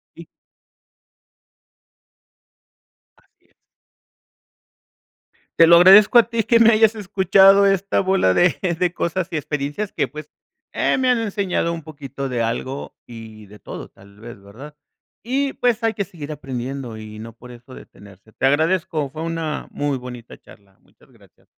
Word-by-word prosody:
Y - - -12 2.9
Así - - -35
es. - - -42 2.0
Te 165 - +7
lo 170 +1 +7
agradezco 195 +6 +7
a - - +8
ti 230 -1 -1
que 235 - +3
me 230 0 +6
hayas 220 0 +3
escuchado 195 -1 +4
esta 195 0 0
bola 190 - +1
de 175 - +2 0.2
de 180 -1 -1
cosas 170 +1 -3
y 160 - -4
experiencias 150 +7 -4
que, - - -2
pues, 150 0 -11 0.4
eh, - - 0
me 260 - 0
han 250 - +2
enseñado 200 -6 -2
un 165 -1 -7
poquito 140 -3 -8
de 120 -2 -2
algo 130 +4 -5
y 110 -2 -12
de 105 +1 -16
todo, - - -10
tal 100 +1 -20
vez, 115 -2 -11
¿verdad? 125 +10 -13 0.5
Y, 270 +4 -2
pues, 240 -2 -1
hay 225 - +1
que 200 - -3
seguir 155 -4 -9
aprendiendo 130 -3 -6
y 110 0 -10
no 115 +1 -10
por 125 +2 -15
eso 120 +1 -14
detenerse. 100 +1 -17
Te 135 - -1
agradezco, 155 0 0
fue 155 +3 -8
una 165 -2 -4
muy 145 -2 -3
bonita 125 -2 -11
charla. 100 -2 -20
Muchas - - -27
gracias. - - -25
150 Hz, 155 wpm, -20 LUFS, 120-195 Hz, 2.9 s, a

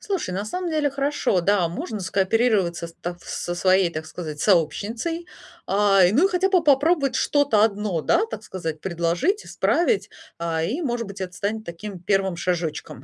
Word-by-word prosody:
Слушай, 385 - -3
на 195 +3 -3
самом 360 +10 -3
деле, 305 -2 +1
хорошо. 275 -8 0
Да, 195 -1 +2
можно 200 +5 -5
скооперироваться 190 -2 +1
с 165 - -14
та 175 - -3
в 175 - -21
со 175 - -4
своей, 185 0 +3
так 160 -1 -6
сказать, 155 -3 -7
сообщницей, 225 - 0 0.4
а, 200 -1 +4
и 180 - +3
ну, 285 - +4
и - - -8
хотя 380 +1 +1
бы 365 -3 +3
попробовать 285 0 +3
что-то 285 -8 +3
одно, 205 -5 0
да, 435 - +2
так 220 - -6
сказать, 165 -7 -5
предложить, 175 - 0
исправить, 390 +5 +1 0.3
а, 165 -1 -1
и, 245 - -2
может 240 - -2
быть, 200 0 -8
это 185 -1 -5
станет 210 +4 -3
таким 180 +2 -7
1 195 0 0
шажочком. 165 -7 -3
200 Hz, 180 wpm, -23 LUFS, 175-275 Hz, 0.4 s, а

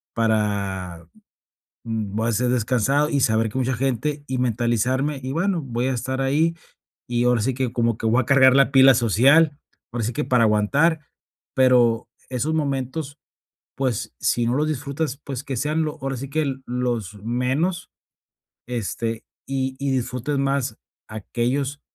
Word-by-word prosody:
para 100 -6 -1 0.8
voy 110 -1 -2
a - - +2
estar 120 +3 +1
descansado, 125 +4 +1
y 145 -3 +1
saber 110 -2 +2
que 105 - -6
mucha 130 0 0
gente, 135 +3 -1
y 130 - -2
mentalizarme, 125 +4 0
y 130 - -3
bueno, 175 +3 0
voy 125 -1 -2
a 135 - 0
estar 130 +2 -3
ahí, 155 +5 +1 0.5
y 120 0 0
ahora 125 -2 +3
sí 130 +5 0
que 130 -2 -1
como 115 -2 +1
que - - -6
voy 115 +3 +3
a - - -6
cargar 130 -1 +6
la 140 0 +4
pila 135 -1 +7
social, 140 +7 +4 0.3
ahora 120 -1 -3
sí 120 - -2
que - - -1
para 125 -3 +3
aguantar". 140 +10 +2 0.6
Pero 120 -4 +3 0.2
esos 130 +5 -1
momentos, 140 0 -2 0.6
pues, 130 -5 -2
si 120 - +1
no 120 +2 +1
los 150 +2 +1
disfrutas, 145 -1 -3
pues, 135 -2 -5
que 135 -3 -4
sean 150 +5 0
lo 155 -1 -4
ahora 135 -1 -3
sí 135 +2 -6
que 145 -2 -1
los 120 -5 -2
menos, 130 +10 -1 0.8
este, 115 -1 -3 0.2
y 130 -1 -2
y 140 -1 -1
disfrutes 130 +2 -2
más 135 -3 -1 0.3
aquellos 125 +6 -2
130 Hz, 160 wpm, -23 LUFS, 115-140 Hz, 0.8 s, pila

